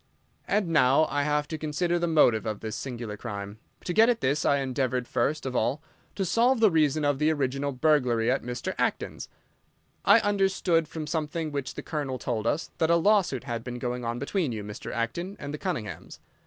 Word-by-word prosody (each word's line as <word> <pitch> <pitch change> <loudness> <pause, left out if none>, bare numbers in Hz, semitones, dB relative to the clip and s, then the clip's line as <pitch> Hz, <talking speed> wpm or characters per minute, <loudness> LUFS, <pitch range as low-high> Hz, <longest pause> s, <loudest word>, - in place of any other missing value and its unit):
"And 200 -3 +1
now 145 -1 +4
I 145 - +1
have 150 0 0
to 160 - -4
consider 170 +3 0
the 170 - 0
motive 120 -9 +3
of 105 -2 -3
this 110 0 -4
singular 120 -5 -5
crime. 100 +1 -6 0.3
To 175 - -1
get 225 +4 +6
at 240 - +2
this, 140 +3 0
I 140 - +4
endeavoured 130 -2 -1
first 145 +6 -1
of 130 -1 -3
all 125 +6 0 0.3
to 195 - -1
solve 235 +7 +3
the 220 -3 +5
reason 155 -2 +2
of 145 -1 +1
the 150 +1 +3
original 140 -1 -1
burglary 125 -5 +2
at 135 - 0
Mr. 120 0 -4
Acton's. - - -2 0.7
I 205 +3 +7
understood, 195 -5 +1
from 155 0 -5
something 155 0 -2
which 140 -2 -4
the - - -6
Colonel 145 -5 -3
told 115 -2 -2
us, 160 +7 -1
that 160 -1 +2
a 170 - +5
lawsuit 175 - +2
had 120 -3 -4
been 125 0 -5
going 125 0 -3
on 120 0 -2
between 145 +3 -1
you, 110 -2 -4
Mr. 105 +1 -7
Acton, 170 - -3
and 145 0 -6
the 150 - -5
Cunninghams. 115 - -5
145 Hz, 200 wpm, -27 LUFS, 125-165 Hz, 0.7 s, I